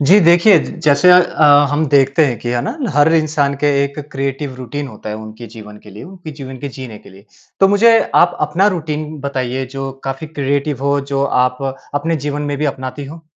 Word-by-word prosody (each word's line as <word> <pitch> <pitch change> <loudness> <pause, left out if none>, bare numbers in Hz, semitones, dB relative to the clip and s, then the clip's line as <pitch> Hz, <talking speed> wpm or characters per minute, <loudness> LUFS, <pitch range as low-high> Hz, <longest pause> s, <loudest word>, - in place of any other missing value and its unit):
जी, 170 +8 +5
देखिए 175 +2 +5
ज - - -6
जैसे 155 +5 +5
अ, 150 -5 +5
हम 155 +2 0
देखते 140 +2 +3
हैं 120 -5 -3
कि 120 - -6
है 120 0 0
ना 230 +6 -4 0.2
हर 150 +2 +3
इंसान 150 -3 +1
के - - +3 0.2
एक 140 +1 -7
क्रिएटिव 135 0 -4
रूटीन 130 +3 -6
होता 110 -2 -10
है 105 - -4
उनके 110 +2 -10
जीवन 105 -2 -12
के 105 - -16
लिए, 105 +2 -11
उनके 180 -3 -11
जीवन 135 -3 -9
के 140 - -6
जीने 125 -5 -9
के - - -17
लिए। 95 +1 -17 0.4
तो 195 - +6
मुझे 225 +3 +5 0.2
आप 175 0 +4
अपना 190 +4 +1
रूटीन 155 -5 -3
बताइए 130 -2 -3
जो 135 0 -4
काफ़ी 135 +3 -5
क्रिएटिव 140 -1 -2
हो, 140 0 +1
जो 140 0 -3
आप 125 -2 0 0.4
अपने 165 +3 -1
जीवन 145 0 -4
में 145 -1 -3
भी 150 - -1
अपनाती 130 +2 -7
हो? 160 +4 -11
140 Hz, 210 wpm, -16 LUFS, 130-155 Hz, 0.4 s, तो